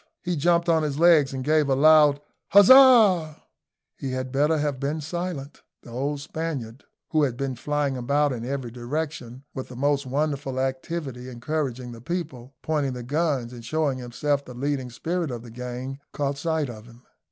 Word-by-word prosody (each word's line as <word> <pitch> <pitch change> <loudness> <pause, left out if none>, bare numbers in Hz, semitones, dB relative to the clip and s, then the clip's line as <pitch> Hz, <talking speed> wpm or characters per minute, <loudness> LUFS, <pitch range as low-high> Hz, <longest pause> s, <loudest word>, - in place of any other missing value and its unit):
He 180 -1 -1
jumped 170 +3 +2
on 165 -1 +3
his 145 -2 -2
legs 160 -4 +5
and 130 -1 -4
gave 150 0 +2
a 135 - +3
loud 150 0 +5 0.3
huzzah. 205 - +7 0.6
He 135 -2 -5
had 130 0 -4
better 150 +4 +2
have 145 -3 -1
been 145 +3 -2
silent. 155 -2 -5 0.2
The 120 - -12
old 140 +4 -2
Spaniard, 140 -6 -5 0.3
who 155 - +3
had 130 -5 0
been 135 -1 -3
flying 145 +2 -1
about 140 +3 +1
in 115 -2 -5
every 130 -1 -4
direction 130 0 -5
with 130 - -6
the 125 - -11
most 140 +1 0
wonderful 140 -1 -2
activity, 130 -1 -4
encouraging 125 -1 -3
the 115 -1 -11
people, 140 -5 -5
pointing 145 -4 0
the 125 -1 -6
guns, 140 -3 -1
and 120 -1 -10
showing 140 +1 -1
himself 140 +4 -1
the 125 - -11
leading 135 0 -2
spirit 165 +7 -3
of 120 -2 -6
the 120 - -11
gang, 125 +3 -6
caught 140 -1 -2
sight 160 -2 -1
of 115 -2 -10
him. 120 +1 -17
140 Hz, 175 wpm, -25 LUFS, 125-155 Hz, 0.6 s, huzzah